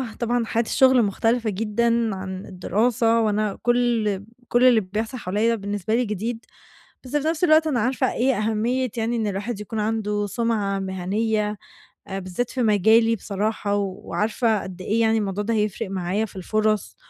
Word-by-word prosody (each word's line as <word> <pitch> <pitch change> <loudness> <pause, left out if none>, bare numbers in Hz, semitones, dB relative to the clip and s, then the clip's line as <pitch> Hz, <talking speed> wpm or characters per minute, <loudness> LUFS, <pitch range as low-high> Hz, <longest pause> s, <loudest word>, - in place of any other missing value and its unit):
طبعًا 240 0 0
حياة 230 +1 0
الشُّغل 260 +1 +4
مختلفة 225 +3 0
جدًا 225 +1 0
عن 190 0 -6
الدراسة 225 +5 +1
وأنا 215 -2 0
كل 235 -5 +1 0.3
كل 240 +1 +3
اللي 240 -3 +6
بيحصل 215 +6 -4
حواليَّ 220 +3 0
بالنسبة 205 +1 -2
لي 245 +1 +1
جديد، 220 +3 -4 0.6
بس 255 - -6
في 295 +1 -2
نفس 325 +1 -1
الوقت 315 -2 +5
أنا 270 -6 +1
عارفة 255 +3 0
إيه 260 +1 +1
أهمية 225 +4 0
يعني 230 +1 0
إن 220 -2 -1
الواحد 205 +3 -3
يكون 215 +1 -5
عنده 210 -1 -1
سُمعة 210 -3 -1
مهنية 210 +3 -1 0.5
بالذات 195 +5 -3
في 260 - -2
مجالي 220 +2 +4
بصراحة 205 0 -2
وعارفة 210 +2 -1
قد 185 -1 -8
إيه 220 +5 0
يعني 225 0 +3
الموضوع 205 -1 -2
ده 230 +2 -1
هيفرق 215 -1 -1
معايا 190 +3 -1
في 210 - -14
الفرص 215 +3 -1
220 Hz, 160 wpm, -23 LUFS, 205-235 Hz, 0.6 s, اللي